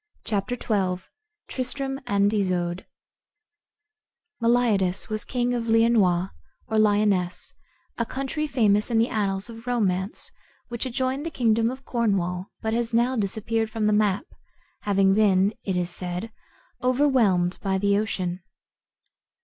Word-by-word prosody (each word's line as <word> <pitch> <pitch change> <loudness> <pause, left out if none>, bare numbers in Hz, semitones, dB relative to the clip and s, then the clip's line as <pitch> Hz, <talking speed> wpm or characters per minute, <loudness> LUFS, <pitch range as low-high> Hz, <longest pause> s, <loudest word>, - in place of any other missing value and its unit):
CHAPTER 210 +4 -1
XII 185 -4 -1 0.4
TRISTRAM 270 +1 -3
AND 200 -1 +2
ISOUDE 180 -3 -1 1.5
Meliadus 230 -6 +2
was 215 0 -2
king 245 -1 -1
of 235 -1 -2
Leonois, 220 -6 +3 0.4
or 220 -2 +1
Lionesse, 205 -4 +1 0.5
a 235 - +1
country 275 +3 -3
famous 210 -6 +2
in 230 - +1
the 230 +2 +3
annals 195 -1 -1
of 230 +1 -11
romance, 200 -5 -1 0.4
which 240 +2 -3
adjoined 260 +2 -1
the 330 - -3
kingdom 230 -5 +2
of 260 +2 -8
Cornwall, 190 -6 0 0.2
but 220 0 0
has 235 0 -1
now 245 +3 +2
disappeared 220 +1 -1
from 220 -1 -2
the 210 - +3
map, 210 - +2 0.5
having 195 -1 +3
been, 200 -1 +3
it 190 - -2
is 175 -1 -1
said, 180 +5 -4 0.5
overwhelmed 250 -9 +2
by 190 -1 0
the 200 +1 +2
ocean. 185 -4 -3
215 Hz, 130 wpm, -25 LUFS, 190-240 Hz, 1.5 s, Leonois